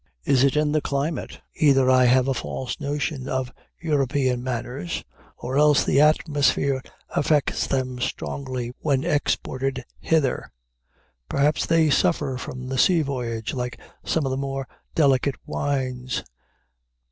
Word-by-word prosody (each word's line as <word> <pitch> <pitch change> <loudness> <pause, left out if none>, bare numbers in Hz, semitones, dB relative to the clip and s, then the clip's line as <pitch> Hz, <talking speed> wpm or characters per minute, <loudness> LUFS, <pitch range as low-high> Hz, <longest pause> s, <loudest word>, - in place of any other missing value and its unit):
Is 135 -2 +3
it 140 0 +3
in 150 -1 +2
the 155 0 +2
climate? 145 +4 -3 0.2
Either 135 -3 +4
I 130 0 +5
have 125 +1 +4
a 135 - +2
false 130 +2 -4
notion 140 -2 -3
of 130 -1 -2 0.3
European 135 -5 +1
manners, 120 -7 -4 0.3
or 130 +3 -1
else 150 -1 +5
the 140 - +3
atmosphere 145 -3 +2 0.3
affects 145 -1 +1
them 130 -2 -1
strangely 125 -1 -4
when 140 -3 +1
exported 135 -2 -1
hither. 155 -6 0 0.8
Perhaps 145 +3 +1
they 165 -2 +3
suffer 145 -5 +1
from 130 0 -6
the 130 0 -2
sea 170 0 +4
voyage 120 -5 -3
like 125 -2 -4 0.2
some 160 -3 0
of 135 - -1
the 130 - -1
more 135 -1 -3 0.3
delicate 140 -2 +3
wines. 130 -3 -2
135 Hz, 135 wpm, -24 LUFS, 130-145 Hz, 0.8 s, I